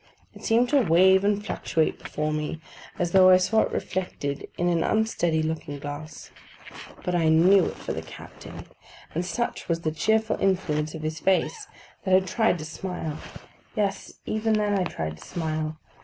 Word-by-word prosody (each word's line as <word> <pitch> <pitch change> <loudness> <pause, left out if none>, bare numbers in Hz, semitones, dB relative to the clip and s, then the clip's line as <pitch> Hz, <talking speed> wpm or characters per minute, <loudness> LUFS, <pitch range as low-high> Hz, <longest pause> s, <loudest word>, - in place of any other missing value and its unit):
It - - -14
seemed 235 +2 +3
to 285 0 +4
wave 190 0 +5
and 205 0 +1
fluctuate 160 -6 -1
before 150 0 -2
me 150 +1 -3 0.4
as 175 -1 -1
though 185 0 +7
I 185 - +8
saw 220 +4 +2
it - - -1
reflected 145 -6 -3
in 175 - +1
an 170 -2 +2
unsteady 175 -8 +1
looking 155 -2 -3
glass; 145 +2 -8 0.7
but 180 - -1
I 165 -2 +3
knew 175 +4 +6
it - - -4
for - - -5
the - - -4
captain; - - -11 0.5
and 170 - -1
such 235 +5 -3
was 165 0 0
the 155 - -1
cheerful 220 +7 +1
influence 155 -5 0
of 155 - -7
his 155 0 -3
face, 195 - 0 0.4
that 190 -1 +3
I - - +7
tried 190 +1 +1
to 155 - -7
smile: 160 -1 -5 0.6
yes, 205 -3 -2
even 220 +1 0
then 210 -1 +1
I 190 -2 +1
tried 80 - -4
to - - -12
smile. 155 -2 -3
175 Hz, 175 wpm, -26 LUFS, 155-200 Hz, 0.7 s, I